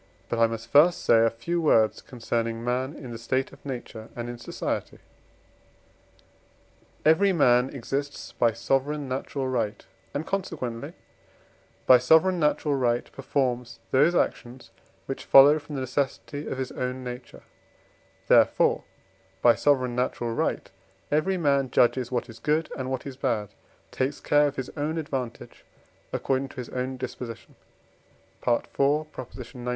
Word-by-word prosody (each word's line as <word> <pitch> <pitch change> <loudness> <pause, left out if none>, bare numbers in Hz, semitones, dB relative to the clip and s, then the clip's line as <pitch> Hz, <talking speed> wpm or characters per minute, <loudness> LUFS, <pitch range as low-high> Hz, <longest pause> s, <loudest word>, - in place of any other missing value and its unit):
But 120 - -1
I 115 - +6
must 115 +1 -7
first 160 +5 +5
say 115 -1 +5
a 115 - +4
few 145 +10 -3
words 110 -8 +3
concerning 115 -1 -3
man 130 +4 -1
in 125 -3 -9
the 115 - -7
state 130 +3 -1
of - - -17
nature 120 -4 -7
and 120 0 -5
in 120 -1 -7
society. - - -4 2.1
Every 185 +6 +5
man 125 -6 +4
exists 140 +2 -4
by 115 -2 +2
sovereign 135 +5 -1
natural 130 +1 -3
right, 120 -5 -2 0.3
and, 145 +3 -2
consequently, 145 -12 -4 0.9
by 125 -1 +8
sovereign 160 +8 +4
natural 150 -1 +1
right 120 -3 0
performs 125 -3 -2
those 150 +7 +4
actions 125 -6 -2 0.3
which 135 - -5
follow 145 +3 +7
from 150 0 -9
the 135 - -2
necessity 140 +3 -3
of - - -4
his 130 -1 -3
own 125 0 -4
nature; 125 0 -8 0.8
therefore - - +4 0.6
by 120 - +7
sovereign 130 -4 +1
natural 120 -2 -1
right - - -2 0.4
every 185 +6 +1
man 140 -5 +2
judges 125 0 +2
what 125 -2 -1
is 115 -1 -12
good 155 +6 0
and 130 -1 -4
what 130 -1 -3
is 135 -2 -7
bad, 115 -7 -1 0.4
takes 130 +2 -2
care 145 0 +3
of 140 - -4
his 130 -1 -5
own 155 +2 -2
advantage 130 -6 -5 0.5
according 135 0 -1
to - - -15
his 125 -3 -6
own 130 +1 -3
disposition 125 -2 -7 0.9
(IV. 120 -1 +1 0.5
xix. 125 0 -9
130 Hz, 145 wpm, -26 LUFS, 120-145 Hz, 2.1 s, by